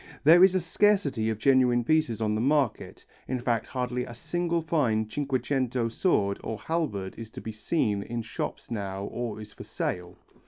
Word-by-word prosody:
There 165 +5 +8
is 190 0 +6
a - - +4
scarcity 165 - +2
of 110 - -1
genuine 125 0 +4
pieces 140 -6 +1
on 105 -1 +1
the 110 - 0
market, 140 -2 0 0.2
in 130 0 -2
fact 120 -2 -1
hardly 125 -1 -2
a 120 - -8
single 170 +5 -1
fine 125 -10 +1
Cinquecento 130 -2 -1
sword 100 - +1
or 110 - -4
halberd 110 - -2
is 115 -1 -7
to - - -9
be 110 - -6
seen 105 -2 0
in 115 +3 -4
shops - - -5
now 100 -3 -3
or 115 0 -4
is 105 -1 -10
for - - -10
sale. 90 0 -4
120 Hz, 180 wpm, -27 LUFS, 110-150 Hz, 0.2 s, There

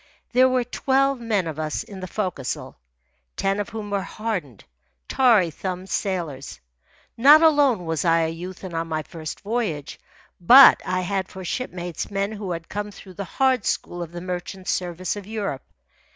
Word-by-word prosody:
There 255 +1 +5
were 255 -1 +1
twelve 270 +2 +1
men 220 -6 0
of 160 -2 -5
us 155 +6 -2
in 205 -4 -10
the 185 - -6
forecastle, 180 -9 -4 0.6
ten 195 +1 0
of 205 - -3
whom 210 -2 -6
were 200 -1 0
hardened, 185 - -5 0.4
tarry 220 -10 +4
thumbed 185 +3 -5
sailors. 165 -9 -3 0.6
Not 290 +7 +7
alone 285 - +4
was 160 -1 -1
I 165 -1 +3
a 160 - 0
youth 175 +3 -8
and 185 -2 -7
on 165 0 -2
my 155 -1 -2
first 155 -2 -8
voyage, 205 -10 -3 0.4
but 250 +10 +9
I 185 0 -1
had 190 0 -2
for 190 -1 -9
shipmates 175 -5 -4
men 200 +1 -1
who 205 -3 -6
had 165 -1 -5
come 205 +1 -4
through 195 -2 -13
the 200 +2 -5
hard 260 +4 +1
school 175 - -2
of 170 -1 -6
the 175 0 -7
merchant 180 +1 -6
service 180 +1 -2
of 205 -1 -8
Europe. 205 -11 -3
190 Hz, 175 wpm, -23 LUFS, 170-220 Hz, 0.6 s, but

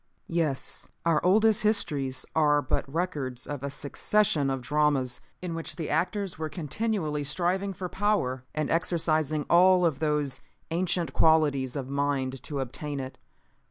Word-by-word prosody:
"Yes. 155 -6 -1 0.2
Our 165 -2 +2
oldest 215 +3 +4
histories 145 -11 +1
are 150 -2 +4
but 135 +1 -2
records 145 -7 -2
of 145 -3 -5
a 140 - -3
succession 145 +1 +1
of 135 -2 -2
dramas 145 -3 +1 0.2
in 175 -2 -3
which 165 0 -4
the 165 -3 -4
actors 185 +3 -1
were 155 -1 -2
continually 155 -1 -2
striving 180 +6 0
for 185 -1 -5
power 185 -11 0
and 155 -1 -1
exercising 155 -3 +1
all 180 +1 +6
of 155 -5 +1
those 150 -4 0 0.3
ancient 175 0 0
qualities 150 -5 +3
of 135 -3 -3
mind 135 -2 -1
to 140 -3 -4
obtain 140 +3 -4
it. 130 0 -7
155 Hz, 145 wpm, -28 LUFS, 140-175 Hz, 0.3 s, all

